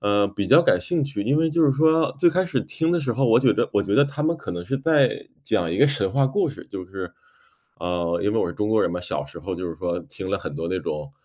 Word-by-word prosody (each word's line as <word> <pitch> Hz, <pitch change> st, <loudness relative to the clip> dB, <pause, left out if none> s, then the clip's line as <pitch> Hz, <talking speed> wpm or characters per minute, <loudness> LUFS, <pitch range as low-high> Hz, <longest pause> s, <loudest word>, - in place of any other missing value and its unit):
呃， 100 Hz, 0 st, +2 dB
比 100 Hz, 0 st, -4 dB
较 170 Hz, -, +6 dB
感 -, -, +3 dB
兴 170 Hz, -5 st, -1 dB
趣， 140 Hz, -7 st, -5 dB
因 130 Hz, +8 st, +1 dB
为 160 Hz, +1 st, +2 dB
就 165 Hz, +1 st, +2 dB
是 145 Hz, -, +5 dB
说 160 Hz, -1 st, +2 dB
最 170 Hz, -, +5 dB
开 185 Hz, +3 st, +1 dB
始 180 Hz, -, -1 dB
听 160 Hz, 0 st, -2 dB
的 175 Hz, -, +2 dB
时 135 Hz, -6 st, -1 dB
候， 130 Hz, +2 st, +1 dB
我 115 Hz, 0 st, +5 dB
觉 130 Hz, 0 st, +4 dB
着 -, -, 0 dB
我 100 Hz, -, +3 dB
觉 100 Hz, +1 st, -1 dB
得 140 Hz, +3 st, +5 dB
他 145 Hz, +1 st, -5 dB
们 160 Hz, +2 st, +1 dB
可 -, -, -7 dB
能 85 Hz, 0 st, -5 dB
是 135 Hz, +5 st, -2 dB
在 145 Hz, -3 st, +1 dB
讲 85 Hz, -2 st, 0 dB
一 90 Hz, -, -2 dB
个 145 Hz, -, +5 dB
神 110 Hz, -10 st, 0 dB
话 135 Hz, 0 st, +2 dB
故 165 Hz, +5 st, 0 dB
事， 145 Hz, -, -9 dB
就 95 Hz, -, -6 dB
是 95 Hz, -1 st, -7 dB, 0.7 s
呃， 85 Hz, -1 st, -1 dB
因 105 Hz, -, +1 dB
为 115 Hz, -, +1 dB
我 -, -, +1 dB
是 85 Hz, -, -4 dB
中 105 Hz, -, -2 dB
国 110 Hz, 0 st, +3 dB
人 -, -, +1 dB
嘛， 90 Hz, +1 st, -4 dB
小 90 Hz, -, -3 dB
时 -, -, -11 dB
候 95 Hz, -, -5 dB
就 90 Hz, +1 st, -5 dB
是 85 Hz, -, -6 dB
说 85 Hz, 0 st, -2 dB
听 85 Hz, -, -8 dB
了 -, -, 0 dB
很 -, -, -7 dB
多 85 Hz, -, -4 dB
那 95 Hz, +1 st, -1 dB
种， 75 Hz, -4 st, -5 dB
115 Hz, 320 characters per minute, -23 LUFS, 90-150 Hz, 0.7 s, 较